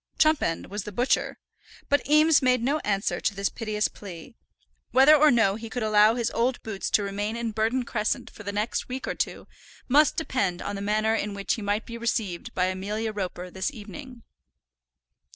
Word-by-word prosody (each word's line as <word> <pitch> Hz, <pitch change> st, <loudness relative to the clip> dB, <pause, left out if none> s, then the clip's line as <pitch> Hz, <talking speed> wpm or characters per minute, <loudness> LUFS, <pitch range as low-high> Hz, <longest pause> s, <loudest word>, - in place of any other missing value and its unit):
Chumpend 310 Hz, -, +2 dB
was 205 Hz, 0 st, -3 dB
the 210 Hz, -, -7 dB
butcher. 245 Hz, +6 st, 0 dB, 0.5 s
But 285 Hz, 0 st, +1 dB
Eames 305 Hz, +1 st, +5 dB
made 250 Hz, -2 st, +2 dB
no 285 Hz, +5 st, +1 dB
answer 200 Hz, -5 st, -1 dB
to 200 Hz, -, 0 dB
this 195 Hz, +1 st, 0 dB
piteous 215 Hz, -2 st, -1 dB
plea. 185 Hz, +2 st, -11 dB, 0.6 s
Whether 270 Hz, +4 st, +7 dB
or 305 Hz, +1 st, +6 dB
no 225 Hz, -6 st, +3 dB
he 225 Hz, 0 st, -8 dB
could 245 Hz, 0 st, -3 dB
allow 215 Hz, +1 st, +5 dB
his 235 Hz, -2 st, -1 dB
old 245 Hz, +2 st, 0 dB
boots 205 Hz, -3 st, -4 dB
to 205 Hz, -, +2 dB
remain 205 Hz, +2 st, -3 dB
in 235 Hz, -1 st, -3 dB
Burton 225 Hz, +4 st, 0 dB
Crescent 215 Hz, -2 st, -2 dB
for -, -, -13 dB
the 200 Hz, -1 st, -4 dB
next 210 Hz, +5 st, -2 dB
week 260 Hz, +2 st, -5 dB
or -, -, -1 dB
two, -, -, -4 dB, 0.4 s
must 290 Hz, +4 st, +4 dB
depend 200 Hz, -, -1 dB
on 205 Hz, -, -4 dB
the 200 Hz, -, -5 dB
manner 215 Hz, +2 st, +1 dB
in 210 Hz, -2 st, -2 dB
which 200 Hz, 0 st, -1 dB
he 225 Hz, -, -4 dB
might 205 Hz, +2 st, -1 dB
be 235 Hz, 0 st, -8 dB
received 220 Hz, -6 st, -2 dB
by 180 Hz, -, +2 dB
Amelia 205 Hz, +4 st, -3 dB
Roper 185 Hz, -2 st, -5 dB
this 190 Hz, +9 st, -2 dB
evening. 245 Hz, +2 st, -10 dB
220 Hz, 190 wpm, -26 LUFS, 200-250 Hz, 0.6 s, Whether